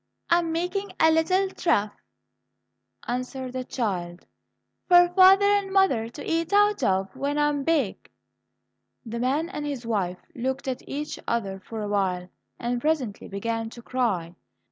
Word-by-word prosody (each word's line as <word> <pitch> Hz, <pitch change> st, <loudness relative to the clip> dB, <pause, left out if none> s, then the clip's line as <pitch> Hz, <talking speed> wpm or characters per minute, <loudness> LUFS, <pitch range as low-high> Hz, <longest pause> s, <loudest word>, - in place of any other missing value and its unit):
"I 340 Hz, -, +6 dB
am 335 Hz, -1 st, -2 dB
making 360 Hz, +4 st, -2 dB
a 320 Hz, -, +6 dB
little 365 Hz, +5 st, +2 dB
trough," 210 Hz, -, +1 dB, 1.1 s
answered 255 Hz, +1 st, -4 dB
the 255 Hz, 0 st, -3 dB
child, 180 Hz, -9 st, -3 dB, 0.6 s
"for 355 Hz, -1 st, +7 dB
father 380 Hz, +2 st, +7 dB
and 405 Hz, -1 st, +2 dB
mother 375 Hz, -, +3 dB
to 285 Hz, -, -9 dB
eat 330 Hz, +1 st, -1 dB
out 415 Hz, -2 st, +4 dB
of 195 Hz, -1 st, 0 dB
when 280 Hz, +2 st, -2 dB
I 295 Hz, 0 st, +3 dB
am 285 Hz, -1 st, -2 dB
big." 285 Hz, -10 st, 0 dB, 1.0 s
The 235 Hz, +1 st, -5 dB
man 280 Hz, +7 st, 0 dB
and 300 Hz, -, -5 dB
his 280 Hz, -5 st, -4 dB
wife 195 Hz, -6 st, -1 dB, 0.2 s
looked 265 Hz, +2 st, -3 dB
at 260 Hz, -1 st, -2 dB
each 295 Hz, +2 st, -4 dB
other 200 Hz, -5 st, -2 dB
for 220 Hz, +3 st, -7 dB
a -, -, -3 dB
while, 185 Hz, -3 st, -1 dB, 0.3 s
and 240 Hz, 0 st, -2 dB
presently 275 Hz, -9 st, -1 dB
began 225 Hz, +3 st, -3 dB
to 235 Hz, +1 st, -12 dB
cry. 205 Hz, -11 st, -1 dB
260 Hz, 155 wpm, -25 LUFS, 220-330 Hz, 1.1 s, for